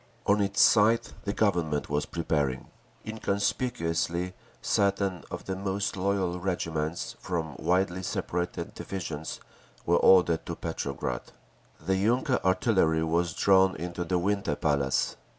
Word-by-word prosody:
On 105 Hz, +1 st, +3 dB
its 100 Hz, 0 st, -1 dB
side 110 Hz, +1 st, +5 dB, 0.2 s
the 100 Hz, -, 0 dB
Government 85 Hz, -9 st, 0 dB
was 75 Hz, 0 st, -1 dB
preparing. 75 Hz, -6 st, -1 dB, 0.4 s
Inconspicuously 100 Hz, -5 st, -1 dB, 0.3 s
certain 100 Hz, -2 st, 0 dB
of -, -, -7 dB
the 95 Hz, -, -3 dB
most 100 Hz, +1 st, -2 dB
loyal 95 Hz, -2 st, 0 dB
regiments, 85 Hz, -3 st, -2 dB
from 80 Hz, -5 st, -3 dB
widely 90 Hz, 0 st, +1 dB
separated 90 Hz, -1 st, -3 dB
divisions, 80 Hz, -5 st, -5 dB, 0.5 s
were 85 Hz, +1 st, +4 dB
ordered 90 Hz, -3 st, +5 dB
to -, -, -3 dB
Petrograd. -, -, -4 dB, 0.5 s
The 95 Hz, 0 st, 0 dB
yunker 125 Hz, +6 st, +2 dB
artillery 95 Hz, -4 st, +2 dB
was 85 Hz, 0 st, 0 dB
drawn 95 Hz, -1 st, +4 dB
into 90 Hz, +2 st, -4 dB
the 90 Hz, +1 st, 0 dB
Winter 100 Hz, -4 st, 0 dB
Palace. 70 Hz, -4 st, 0 dB
90 Hz, 120 wpm, -28 LUFS, 80-100 Hz, 0.5 s, side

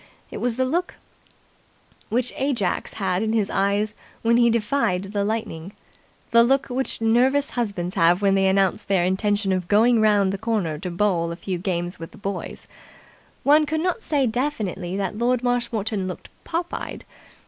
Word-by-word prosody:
It -, -, -6 dB
was 245 Hz, -2 st, 0 dB
the 260 Hz, -, +2 dB
look 345 Hz, +7 st, -1 dB, 1.1 s
which 245 Hz, +2 st, -1 dB
Ajax 260 Hz, -9 st, -1 dB
had 190 Hz, -2 st, -1 dB
in 220 Hz, 0 st, 0 dB
his 215 Hz, -3 st, +1 dB
eyes 200 Hz, +2 st, +1 dB, 0.3 s
when 230 Hz, +1 st, +4 dB
he 235 Hz, -1 st, +5 dB
defied 220 Hz, -4 st, +1 dB
the 200 Hz, +1 st, -2 dB
lightning, 205 Hz, -4 st, -3 dB, 0.6 s
the 235 Hz, 0 st, +7 dB
look 270 Hz, +3 st, +2 dB
which 255 Hz, -1 st, -2 dB
nervous 255 Hz, +5 st, +3 dB
husbands 200 Hz, -7 st, -2 dB
have 175 Hz, -2 st, +4 dB
when 200 Hz, -1 st, +3 dB
they 195 Hz, 0 st, +3 dB
announce 190 Hz, -1 st, +2 dB
their 190 Hz, -3 st, +1 dB
intention 200 Hz, +2 st, +1 dB
of 185 Hz, -2 st, -1 dB
going 225 Hz, +3 st, +4 dB
round 205 Hz, -3 st, +3 dB
the 195 Hz, -, -4 dB
corner 210 Hz, -9 st, -1 dB
to 180 Hz, -, -4 dB
bowl 175 Hz, -2 st, 0 dB
a -, -, -4 dB
few 180 Hz, 0 st, -4 dB
games 175 Hz, -1 st, -3 dB
with 165 Hz, -, -7 dB
the -, -, -14 dB
boys. 200 Hz, 0 st, -5 dB, 0.8 s
One 300 Hz, +2 st, +5 dB
could 315 Hz, +1 st, -1 dB
not 365 Hz, +6 st, -1 dB
say 290 Hz, -9 st, +1 dB
definitely 215 Hz, -7 st, -2 dB
that 200 Hz, +2 st, -3 dB
Lord 245 Hz, +1 st, +1 dB
Marshmoreton 220 Hz, -5 st, -1 dB
looked 185 Hz, -, -7 dB, 0.2 s
pop 340 Hz, +1 st, -3 dB
eyed. -, -, -6 dB
210 Hz, 170 wpm, -23 LUFS, 190-245 Hz, 1.1 s, the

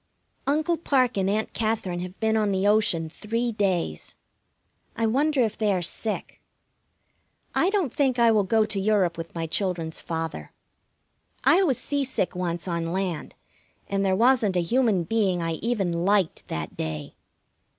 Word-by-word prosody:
Uncle 310 Hz, +4 st, +1 dB
Parke 260 Hz, -6 st, +1 dB
and 190 Hz, 0 st, +1 dB
Aunt 215 Hz, +2 st, -1 dB
Katherine 215 Hz, -6 st, -1 dB
have 180 Hz, +1 st, -7 dB
been 220 Hz, 0 st, +1 dB
on 210 Hz, -2 st, +2 dB
the 190 Hz, 0 st, 0 dB
ocean 205 Hz, -6 st, +3 dB
three 230 Hz, +8 st, -2 dB
days. 185 Hz, -, -1 dB, 0.8 s
I 225 Hz, -, 0 dB
wonder 275 Hz, +5 st, +2 dB
if 220 Hz, -3 st, +1 dB
they 215 Hz, -2 st, +1 dB
are 180 Hz, -2 st, -1 dB
sick. 215 Hz, +5 st, -3 dB, 1.1 s
I 365 Hz, -, +3 dB
don't 385 Hz, -, 0 dB
think 265 Hz, -3 st, +1 dB
I 235 Hz, -1 st, +5 dB
will 215 Hz, -2 st, +4 dB
go 215 Hz, +3 st, +2 dB
to 210 Hz, -2 st, -2 dB
Europe 195 Hz, -4 st, +2 dB
with 165 Hz, +1 st, -8 dB
my 165 Hz, -1 st, -2 dB
children's 165 Hz, -2 st, -2 dB
father. 165 Hz, -1 st, -5 dB, 0.9 s
I 360 Hz, -, +5 dB
was 285 Hz, -, +2 dB
seasick 270 Hz, -10 st, -2 dB
once 175 Hz, -1 st, -3 dB
on 170 Hz, -1 st, -2 dB
land, 185 Hz, -3 st, -3 dB, 0.5 s
and 195 Hz, 0 st, 0 dB
there 190 Hz, -1 st, +2 dB
wasn't 225 Hz, -4 st, +3 dB
a -, -, +3 dB
human 225 Hz, -2 st, +2 dB
being 195 Hz, -1 st, +1 dB
I 165 Hz, -1 st, -2 dB
even 220 Hz, -6 st, 0 dB
liked 185 Hz, +1 st, +1 dB
that 80 Hz, -1 st, -4 dB
day. 75 Hz, -2 st, -5 dB
200 Hz, 160 wpm, -25 LUFS, 175-230 Hz, 1.1 s, I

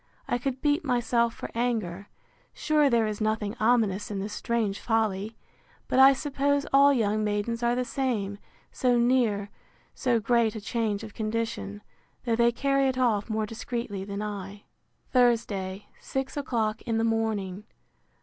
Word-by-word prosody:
—I 245 Hz, -, 0 dB
could 265 Hz, +1 st, -3 dB
beat 295 Hz, +3 st, +2 dB
myself 240 Hz, -3 st, +1 dB
for -, -, -7 dB
anger. 215 Hz, -6 st, -2 dB, 0.5 s
Sure 300 Hz, -2 st, +2 dB
there 235 Hz, -3 st, +3 dB
is 215 Hz, 0 st, -4 dB
nothing 215 Hz, 0 st, -1 dB
ominous 215 Hz, -3 st, +2 dB
in 205 Hz, -, -4 dB
this 200 Hz, +2 st, -4 dB
strange 225 Hz, -4 st, -1 dB
folly!—But 220 Hz, +3 st, -3 dB
I 270 Hz, +1 st, +9 dB
suppose 285 Hz, 0 st, 0 dB
all 280 Hz, +1 st, +7 dB
young 215 Hz, -4 st, +1 dB
maidens 210 Hz, +3 st, -1 dB
are 240 Hz, 0 st, +2 dB
the 250 Hz, 0 st, -1 dB
same, 225 Hz, -6 st, -2 dB, 0.3 s
so 250 Hz, -1 st, +2 dB
near 235 Hz, -5 st, +2 dB, 0.4 s
so 245 Hz, -3 st, +1 dB
great 230 Hz, 0 st, +2 dB
a -, -, -4 dB
change 215 Hz, -1 st, -2 dB
of 215 Hz, -2 st, -9 dB
condition, 215 Hz, -, -3 dB, 0.4 s
though 230 Hz, -2 st, +2 dB
they 235 Hz, +1 st, +4 dB
carry 275 Hz, +2 st, +1 dB
it 260 Hz, -1 st, -1 dB
off 230 Hz, -4 st, +1 dB
more 220 Hz, 0 st, 0 dB
discreetly 225 Hz, -2 st, -5 dB
than 200 Hz, +1 st, -4 dB
I. 205 Hz, -1 st, -6 dB, 0.5 s
Thursday, 210 Hz, -6 st, +1 dB
six 265 Hz, 0 st, -4 dB
o'clock 225 Hz, -6 st, -1 dB
in 225 Hz, -2 st, -2 dB
the 225 Hz, -, +1 dB
morning. 215 Hz, -4 st, -1 dB
225 Hz, 150 wpm, -27 LUFS, 205-245 Hz, 0.5 s, I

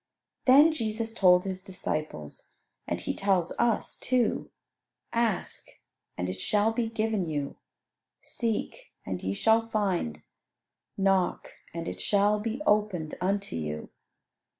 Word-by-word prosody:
Then 290 Hz, +5 st, +7 dB
Jesus 225 Hz, -3 st, -2 dB
told 180 Hz, -5 st, +5 dB
His 190 Hz, -1 st, -4 dB
disciples, 155 Hz, -, -4 dB, 0.3 s
and -, -, -1 dB
He -, -, -2 dB
tells 190 Hz, -4 st, +1 dB
us 235 Hz, -2 st, +1 dB
too, 250 Hz, -3 st, +1 dB, 0.6 s
"Ask, 230 Hz, -5 st, 0 dB, 0.5 s
and 90 Hz, -, -1 dB
it 95 Hz, 0 st, -4 dB
shall 215 Hz, +2 st, +2 dB
be 230 Hz, -1 st, 0 dB
given 220 Hz, -4 st, 0 dB
you; 145 Hz, -3 st, -3 dB, 0.6 s
seek, 230 Hz, -3 st, -3 dB
and 90 Hz, -1 st, -3 dB
ye 95 Hz, +1 st, -2 dB
shall 225 Hz, -, +3 dB
find; 185 Hz, -, -1 dB, 0.7 s
knock, 195 Hz, -2 st, +1 dB, 0.2 s
and 165 Hz, 0 st, -5 dB
it -, -, -5 dB
shall 205 Hz, +1 st, +3 dB
be 230 Hz, +6 st, -3 dB
opened 205 Hz, -, +1 dB
unto 200 Hz, +2 st, -1 dB
you." 75 Hz, -1 st, -4 dB
200 Hz, 125 wpm, -28 LUFS, 165-225 Hz, 0.7 s, Then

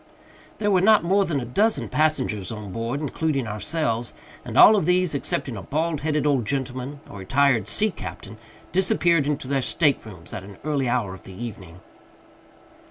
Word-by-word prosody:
There 205 Hz, -1 st, 0 dB
were 185 Hz, -2 st, +4 dB
not 215 Hz, 0 st, +5 dB
more 195 Hz, +3 st, +2 dB
than 150 Hz, -6 st, -1 dB
a 125 Hz, -, -5 dB
dozen 210 Hz, -, +1 dB
passengers 130 Hz, -, 0 dB
on 105 Hz, -3 st, -7 dB
board, 115 Hz, +7 st, -3 dB
including 145 Hz, -2 st, -1 dB
ourselves; 115 Hz, +3 st, -2 dB, 0.3 s
and -, -, -5 dB
all 215 Hz, -, +9 dB
of 200 Hz, -, 0 dB
these, 180 Hz, -2 st, +2 dB
excepting 135 Hz, -2 st, -2 dB
a 100 Hz, -, -6 dB
bald 155 Hz, -, -2 dB
headed 150 Hz, 0 st, 0 dB
old 135 Hz, -7 st, +1 dB
gentleman 135 Hz, +1 st, -4 dB
a -, -, -12 dB
retired 130 Hz, +4 st, +2 dB
sea 215 Hz, 0 st, +2 dB
captain 110 Hz, -, -9 dB, 0.3 s
disappeared 170 Hz, -4 st, +2 dB
into 145 Hz, -3 st, -2 dB
their 135 Hz, 0 st, 0 dB
staterooms 110 Hz, -, -1 dB
at -, -, -5 dB
an 100 Hz, 0 st, -12 dB
early 140 Hz, -4 st, 0 dB
hour 120 Hz, -6 st, -1 dB
of 95 Hz, -, -11 dB
the 95 Hz, -, -10 dB
evening. 95 Hz, -6 st, -8 dB
140 Hz, 170 wpm, -24 LUFS, 115-160 Hz, 0.3 s, all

